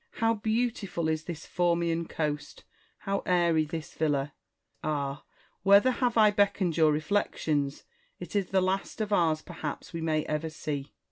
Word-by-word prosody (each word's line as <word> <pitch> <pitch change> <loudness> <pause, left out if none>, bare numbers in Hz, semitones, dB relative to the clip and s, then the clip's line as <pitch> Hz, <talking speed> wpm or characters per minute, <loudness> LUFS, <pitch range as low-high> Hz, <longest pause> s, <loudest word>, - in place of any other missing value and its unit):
How 225 0 +2
beautiful 220 -5 -1
is 160 0 -1
this 165 -3 -6
Formian 170 -1 0
coast! 150 -2 -3 0.4
how 195 0 -1
airy 170 -3 +3
this 160 +1 -6
villa! 145 -2 0 0.5
Ah, 140 -2 -2 0.4
whether 200 +6 +6
have 245 -2 0
I 215 -1 +7
beckoned 200 -4 +2
your 155 -2 +5
reflections! 150 -3 0 0.2
— - - -40
it - - -8
is 200 -3 +1
the 190 -1 +2
last 190 +3 -1
of 210 -1 -1
ours 160 -4 +2
perhaps 165 -1 -6
we 165 - -4
may 155 -1 0
ever 155 +1 -2
see. 145 -2 -5
170 Hz, 155 wpm, -29 LUFS, 155-200 Hz, 0.5 s, I